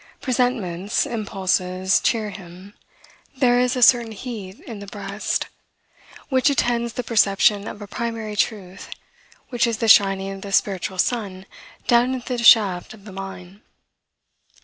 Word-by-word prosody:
Presentiments, 230 -8 -1
impulses, 190 -3 0
cheer 215 -2 0
him. 185 +1 -12 0.6
There 245 -2 +3
is 250 0 +1
a 250 - +2
certain 235 -2 +5
heat 210 -4 -8
in 225 -4 -9
the 200 - -9
breast, 200 0 -3 0.8
which 260 0 +3
attends 235 -4 0
the 250 - -4
perception 205 -2 +2
of 210 - -8
a - - -10
primary 225 -1 -5
truth, 200 -3 -3 0.6
which 245 -1 +1
is 230 -2 -2
the 225 - -1
shining 195 -2 +4
of 195 0 -8
the 200 - -8
spiritual 190 -1 0
sun 195 -3 -2 0.4
down 245 +1 +3
into 250 0 -4
the 235 - -3
shaft 205 -4 +5
of 200 -2 -19
the 205 - -10
mine. 190 0 -9
210 Hz, 145 wpm, -22 LUFS, 195-235 Hz, 0.8 s, certain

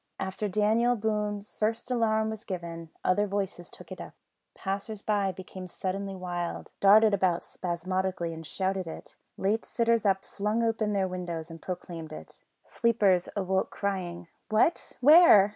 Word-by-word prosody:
After 190 +2 -2
David 220 +4 +2
Boone's 210 -1 -2
first 225 +3 -1
alarm 220 -2 +2
was 220 0 -7
given, 170 -4 -6
other 205 +3 +2
voices 195 -3 -3
took - - -14
it - - -6
up; - - -10 0.4
passers 200 +2 -4
by 200 -2 +1
became 185 0 -9
suddenly 195 +2 -4
wild, 175 -2 -4
darted 210 +2 +7
about 185 -3 +2
spasmodically 180 0 -2
and 165 0 -8
shouted 190 +2 -2
it; 160 - -9 0.2
late 210 +4 +1
sitters 230 -1 +1
up 195 -2 +2
flung 210 +3 -1
open 220 -2 0
their 195 -2 +1
windows 175 -3 -5
and 165 -1 -10
proclaimed 170 -3 -6
it; 155 - -10 0.2
sleepers 205 -6 +2
awoke 190 -1 0
crying, 180 -4 -3 0.2
"What! 225 +10 +2
where?" 290 - +8
195 Hz, 145 wpm, -28 LUFS, 180-215 Hz, 0.4 s, where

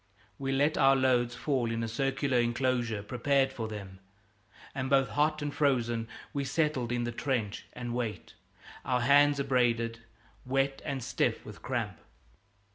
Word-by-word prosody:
We 135 -1 -2
let 145 +3 +2
our 135 -1 +6
loads 125 -2 +2
fall 130 -5 0
in 115 0 -2
a - - -1
circular 135 +2 0
enclosure 120 -3 0
prepared 135 +4 +1
for 115 -4 -4
them, 100 -3 -8 0.7
and 130 -1 -3
both 135 -3 +3
hot 150 +5 +1
and 145 0 -3
frozen 120 -5 +1 0.3
we 140 - -1
settled 135 -4 0
in 120 0 0
the 120 - -2
trench 115 -4 -2
and 120 -1 -5
wait 120 -3 -4 0.5
our 125 -1 +1
hands 145 +2 +5
abraded, 120 -4 +1 0.4
wet, 135 +1 0
and 135 -3 -3
stiff - - -1
with - - -10
cramp. - - -3
130 Hz, 150 wpm, -30 LUFS, 120-135 Hz, 0.7 s, our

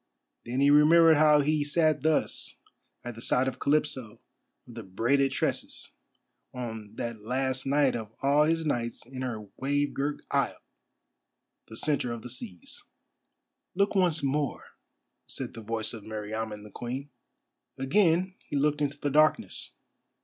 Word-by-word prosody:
Then 125 +3 -1
he 140 +1 +5
remembered 160 +2 +7
how 150 -1 +6
he 155 +2 +1
had 145 - -1
sat 155 -1 +2
thus 155 0 0 0.5
at 120 - -5
the 115 - -11
side 125 +2 +2
of 130 - -3
Calypso 140 -6 0 0.5
of 120 - -12
the 115 - -7
braided 120 +8 +1
tresses, - - -2 0.6
on 110 -4 -6
that 115 -2 -5
last 130 +4 -2
night 140 -1 +3
of 110 -2 -5
all 145 +2 +4
his 165 +1 +1
nights 120 -6 -2
in 130 +1 -8
her 115 -5 -4
wave 145 +2 0
girt 145 +1 -2
isle, - - +1 1.1
the 110 - -8
centre 140 -4 0
of 115 -1 -6
the 125 - -6
seas. 100 -8 -8 0.9
"Look 200 +2 +2
once 180 -6 +2
more," 140 0 -1 0.6
said - - -5
the 115 - -8
voice 110 +1 -3
of 115 - -7
Meriamun 110 0 -5
the 105 - -12
Queen. 130 +6 -6 0.7
Again 175 +5 +2
he - - -6
looked 150 +1 +1
into 145 0 -1
the 145 - -1
darkness. 155 +2 +2
135 Hz, 150 wpm, -28 LUFS, 115-150 Hz, 1.1 s, remembered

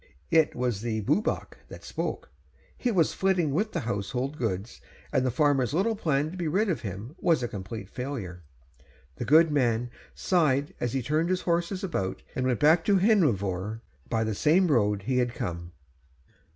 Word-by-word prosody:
It 160 -2 +4
was 120 -5 -1
the 110 -2 -2
Bwbach 150 - -1
that - - -11
spoke. - - -4 0.4
He 250 - -1
was 180 -9 +2
flitting 185 -6 +1
with 210 +9 0
the - - -2
household 120 +5 -3
goods, 110 -4 -3 0.3
and - - +3
the 130 - +1
farmer's 140 0 +2
little 220 +6 +1
plan 155 -6 0
to 185 - -8
be 175 -3 -2
rid 195 +7 +1
of 170 - -1
him 105 +5 -6
was 165 -7 +2
a - - 0
complete 100 0 -7
failure. 110 -8 -6 0.8
The - - -3
good 160 +2 +5
man 120 -4 +1 0.2
sighed 145 -6 +1
as 120 -1 -2
he 135 -2 -1
turned 155 +6 0
his 185 0 0
horses 175 +3 -1
about 95 - -3
and 130 0 -1
went 125 -2 0
back 160 +3 +5
to 200 -2 +4
Hendrefawr 110 - +1 0.3
by 115 -1 +1
the 110 -1 -1
same 165 - +3
road 105 -7 +2
he 125 +4 +1
had 120 -1 0
come. 85 0 -5
135 Hz, 180 wpm, -27 LUFS, 110-170 Hz, 0.8 s, good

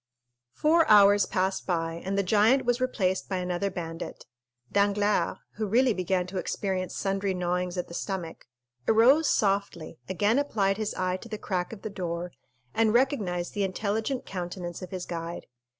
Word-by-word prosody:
Four 325 +2 +4
hours 205 -1 +7
passed 190 +1 -1
by 165 -2 -1
and 195 +1 -2
the 200 - +2
giant 220 +7 +4
was 245 +1 +1
replaced 190 -7 0
by 190 - -1
another 180 +2 -1
bandit. 165 -2 -6 0.5
Danglars, 205 +1 +2 0.2
who 215 -1 -1
really 245 +4 +3
began 185 -1 0
to 185 +1 -4
experience 185 -1 -2
sundry 195 -1 -1
gnawings 180 0 -1
at 180 - -2
the - - -11
stomach, 175 -3 -5 0.4
arose 260 +8 +5
softly, 195 -6 0
again 205 +7 +2
applied 200 -9 +1
his 215 -1 -3
eye 185 0 -1
to 230 - -12
the 215 - -4
crack 180 -4 -2
of 220 -3 -10
the 215 - -4
door, 175 -2 -4 0.4
and 225 0 +2
recognized 205 -10 +1
the 205 - 0
intelligent 215 +6 -2
countenance 175 -1 -5
of 185 - -7
his 185 -1 -5
guide. 170 0 -5
195 Hz, 165 wpm, -27 LUFS, 180-215 Hz, 0.5 s, hours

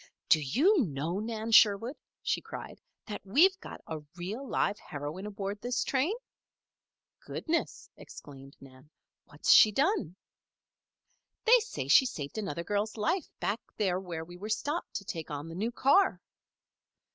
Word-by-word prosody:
"Do 155 - +6
you 290 - +3
know, 160 +2 -3
Nan 220 +1 -4
Sherwood," 225 +5 +5 0.3
she - - 0
cried, - - -9 0.2
"that 210 -3 -6
we've 350 - +4
got - - -10
a 160 -1 -5 0.2
real, 205 +10 -5
live 205 0 0
heroine 150 +7 -6
aboard 205 0 -5
this 245 0 -1
train?" 280 +10 0 1.0
"Goodness!" 335 +1 -3
exclaimed 135 -1 -12
Nan. 135 +1 -16 0.4
"What's 145 +1 0
she 215 - +8
done?" 270 - 0 1.3
"They - - +7
say 455 +1 -5
she 265 - +6
saved 150 - -5
another 185 -5 -4
girl's 210 +3 -2
life 325 - 0
back 210 +4 -1 0.2
there 185 -3 +1
where 170 -4 -6
we 180 +5 -9
stopped 295 +9 -2
to 200 - -4
take 165 -4 -6
on 145 +1 -5
the - - -8
new 215 +7 -2
car." 280 +11 +3
205 Hz, 145 wpm, -30 LUFS, 165-260 Hz, 1.3 s, she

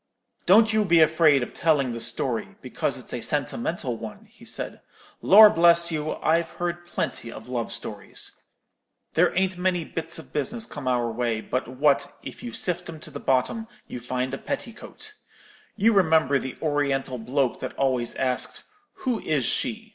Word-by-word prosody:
"'Don't 220 +4 +6
you 215 -1 +3
be 170 -4 +4
afraid 155 -4 +5
of - - -7
telling 145 -6 +2
the 115 - -5
story, 115 - -2
because - - -2
it's - - -7
a - - -3
sentimental - - -2
one,' - - -9
he - - -20
said: - - -6 0.4
'Lor' 215 +3 +9
bless 170 -2 +4
you, 155 -1 -2
I've 165 +1 +2
heard 175 0 -3
plenty 115 -8 -3
of - - -10
love 120 -2 -3
stories. - - -5 0.7
There - - +4
ain't 190 -1 +1
many 180 -2 0
bits 165 +1 -5
of 160 - -12
business 220 - -2
come 145 - -7
our 120 -2 +1
way 115 -1 -1
but 125 +3 -3
what, 140 +3 +1
if - - -9
you 240 -1 -6
sift 180 -4 -2
'em 160 -2 -8
to 155 - -10
the 145 - -6
bottom, 135 - 0 0.2
you 125 - -6
find 125 +2 -3
a 135 - -3
petticoat. 280 - -6 0.6
You 225 +2 +3
remember 160 -7 +4
the 130 -1 -6
Oriental 140 -4 0
bloke 130 +2 0
that - - -5
always 130 -3 0
asked, 130 -1 -2 0.4
'Who 250 -4 0
is 145 -9 0
she?' 225 - -1
155 Hz, 170 wpm, -25 LUFS, 130-180 Hz, 0.7 s, Lor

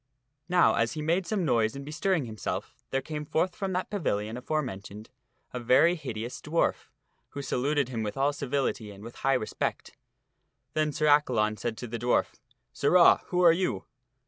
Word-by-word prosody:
Now, 180 -1 +5
as 115 0 +1
he 155 - -4
made 170 +3 +1
some 200 -4 0
noise 115 -4 +2
in 140 - -6
bestirring 160 +1 0
himself, 110 -3 -5 0.2
there 135 0 -1
came 150 +1 -5
forth 175 +4 0
from 195 -1 -3
that 185 +1 -2
pavilion 110 - -1
aforementioned 115 -7 -4 0.4
a 125 - -3
very 130 +8 +4
hideous 125 -7 -5
dwarf, 165 +3 0 0.4
who 140 - -6
saluted 140 +1 0
him 115 -3 -3
with 105 +3 -4
all 140 +2 +2
civility 135 -6 -2
and 100 0 -11
with 115 +1 -10
high 135 0 +2
respect. 110 -4 -3 0.8
Then 155 -1 +1
Sir 155 +2 -1
Accalon 125 -8 +3
said 115 0 -3
to 125 - -6
the 115 0 -5
dwarf, 120 0 0 0.2
" 120 0 -51
Sirrah, 175 +5 +5
who 180 0 +1
are 170 - +8
you?" 165 - -1
135 Hz, 175 wpm, -28 LUFS, 115-160 Hz, 0.8 s, are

